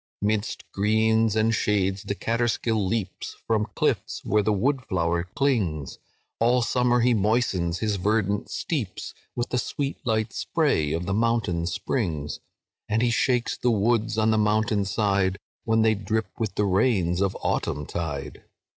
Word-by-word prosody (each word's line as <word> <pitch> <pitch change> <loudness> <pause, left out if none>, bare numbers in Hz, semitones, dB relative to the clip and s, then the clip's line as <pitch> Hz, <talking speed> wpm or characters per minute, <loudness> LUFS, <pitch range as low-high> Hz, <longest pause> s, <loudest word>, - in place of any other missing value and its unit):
"Midst 105 +1 -1
greens 110 +1 +2
and 110 +1 +2
shades 100 -3 +1
the 100 -1 -3
Catterskill 115 -2 0
leaps 95 -2 -3
From 110 -2 +1
cliffs - - -1
where 105 +1 +3
the 110 - +1
wood 130 +7 +1
flower 85 -2 0
clings; 105 - 0 0.4
All 120 +2 +3
summer 125 0 +2
he 125 +1 +4
moistens 105 -5 +1
his 105 -2 0
verdant 105 +1 0
steeps 130 - -3 0.2
With 120 0 -2
the 125 - 0
sweet 140 +3 -3
light 110 -3 0
spray 75 -2 +1
of 85 +3 -2
the 95 - -1
mountain 105 -6 +1
springs; 85 - -2 0.5
And 110 +2 +2
he 120 - +2
shakes 125 +1 +1
the 125 - 0
woods 110 0 +1
on 110 0 +3
the 110 - +2
mountain 105 -1 +2
side, 100 -2 +1 0.3
When 110 -1 +3
they 110 -1 +4
drip 110 +2 -2
with 110 -4 -2
the 105 - +1
rains 95 -3 +2
of 100 -1 0
autumn 75 - -1
tide. 75 -4 -5
110 Hz, 155 wpm, -25 LUFS, 95-115 Hz, 0.5 s, he